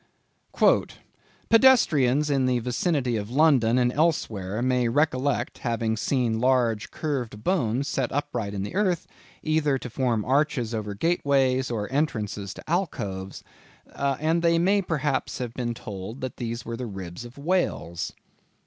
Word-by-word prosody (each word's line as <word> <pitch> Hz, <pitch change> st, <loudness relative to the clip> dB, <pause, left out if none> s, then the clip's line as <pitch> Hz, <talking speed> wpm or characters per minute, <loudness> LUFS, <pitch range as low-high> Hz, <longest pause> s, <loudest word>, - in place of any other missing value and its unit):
Ex_. -, -, +4 dB, 0.6 s
"Pedestrians 150 Hz, -, +5 dB
in 135 Hz, -2 st, +2 dB
the 125 Hz, -1 st, +2 dB
vicinity 125 Hz, +1 st, 0 dB
of 105 Hz, 0 st, -4 dB
London 130 Hz, -4 st, +4 dB
and 125 Hz, -1 st, +2 dB
elsewhere 110 Hz, -, 0 dB
may 125 Hz, -1 st, +2 dB
recollect 140 Hz, +1 st, 0 dB
having 115 Hz, -2 st, -1 dB
seen 115 Hz, -1 st, 0 dB
large 120 Hz, -3 st, +2 dB
curved 125 Hz, -9 st, -4 dB
bones 135 Hz, -, 0 dB
set 130 Hz, -3 st, -1 dB
upright 125 Hz, -8 st, -3 dB
in 95 Hz, -, -2 dB
the 100 Hz, -, -6 dB
earth, 185 Hz, -4 st, +1 dB, 0.4 s
either 155 Hz, -3 st, +1 dB
to 125 Hz, -2 st, -8 dB
form 120 Hz, -4 st, 0 dB
arches 135 Hz, -4 st, +1 dB
over 105 Hz, -2 st, -3 dB
gateways, 135 Hz, -, +1 dB
or 110 Hz, -4 st, -2 dB
entrances 105 Hz, -, -1 dB
to -, -, -12 dB
alcoves, 100 Hz, -, -3 dB, 0.5 s
and 155 Hz, +4 st, 0 dB
they 170 Hz, 0 st, +3 dB
may 195 Hz, +4 st, +3 dB
perhaps 150 Hz, -6 st, -1 dB
have 120 Hz, -2 st, -4 dB
been 120 Hz, -2 st, -3 dB
told 105 Hz, +3 st, -7 dB
that 130 Hz, -1 st, -5 dB
these 115 Hz, -1 st, -4 dB
were 115 Hz, -, -4 dB
the 125 Hz, +1 st, -5 dB
ribs 95 Hz, -1 st, -7 dB
of 120 Hz, +2 st, -12 dB
whales." 145 Hz, -, -1 dB
130 Hz, 145 wpm, -25 LUFS, 115-150 Hz, 0.6 s, Pedestrians